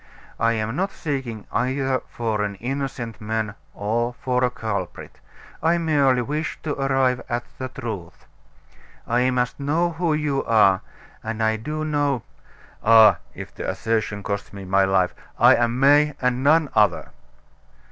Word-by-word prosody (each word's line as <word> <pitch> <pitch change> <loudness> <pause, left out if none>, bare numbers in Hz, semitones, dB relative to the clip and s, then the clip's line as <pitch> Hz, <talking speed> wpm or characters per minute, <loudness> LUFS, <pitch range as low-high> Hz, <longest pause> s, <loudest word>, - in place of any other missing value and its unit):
I 115 0 +3
am 110 +1 -2
not 195 +5 -1
seeking 130 - -4
either 130 0 0
for 110 -3 -2
an 100 -1 -2
innocent 125 0 -4
man 110 -1 -2 0.2
or 120 +4 -1
for 125 -2 -1
a 125 - +3
culprit; 110 -7 -5 0.4
I 165 +2 +3
merely 140 -6 +2
wish 150 +5 -3
to 150 - -2
arrive 135 -2 +1
at 120 -1 -1 0.2
the 130 - -3
truth. 110 -9 -7 0.8
I 125 +2 +2
must 125 0 -1
know 160 +5 +1
who 165 -1 0
you 145 -3 -1
are 100 -5 +4 0.4
and 110 0 -3
I 110 0 +2
do 155 +7 -4
know 145 -5 0 0.3
" - - -26
"Ah! 110 -5 +7 0.2
if - - -8
the - - -4
assertion 110 -2 -2
costs 100 0 -4
me 100 -1 -9
my 95 +1 +3
life 95 -2 +2 0.2
I'm 120 +1 +4
May 145 +2 +5
and 125 0 0
none 155 +1 +4
other." 105 -5 +2
125 Hz, 150 wpm, -23 LUFS, 110-140 Hz, 0.8 s, Ah